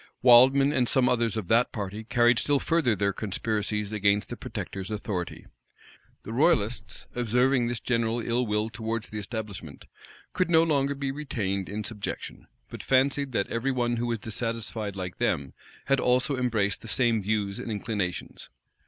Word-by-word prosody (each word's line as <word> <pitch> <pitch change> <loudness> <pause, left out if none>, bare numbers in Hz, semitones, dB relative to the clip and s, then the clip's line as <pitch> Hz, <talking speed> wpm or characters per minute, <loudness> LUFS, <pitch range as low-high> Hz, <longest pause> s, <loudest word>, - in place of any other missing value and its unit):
Wildman 130 +3 +7
and 125 -4 +2
some 130 -3 +3
others 115 -2 +1
of 105 -5 -4
that 115 +2 +3
party 105 0 -5
carried 120 +1 +3
still 145 -1 +2
further 140 -5 +1
their 100 -1 0
conspiracies 105 0 -2
against 100 -1 +1
the - - -4
protector's 95 0 -6
authority. 105 -4 -4 0.8
The 110 - -6
royalists, 125 -5 +1
observing 125 +1 +2
this 120 -1 -2
general 115 -1 0
ill 120 +1 0
will 105 +1 -1
towards 115 -1 -4
the 110 - -5
establishment, 105 - -7 0.5
could 185 -1 0
no 165 -1 +5
longer 140 -3 +1
be 140 -1 -2
retained 105 -10 -3
in 105 +1 -4
subjection; 105 -1 -6 0.2
but - - -8
fancied 135 +1 +2
that 100 - 0
every 120 +4 0
one 120 -2 0
who 120 +1 -1
was 115 -1 -1
dissatisfied 110 -2 -4
like 90 -2 -6
them, 70 -1 0 0.3
had 135 -1 +2
also 130 +4 +2
embraced 110 -6 0
the - - -10
same 115 -1 +2
views 100 -1 -1
and - - -6
inclinations. 100 -4 -4
115 Hz, 160 wpm, -27 LUFS, 105-125 Hz, 0.8 s, Wildman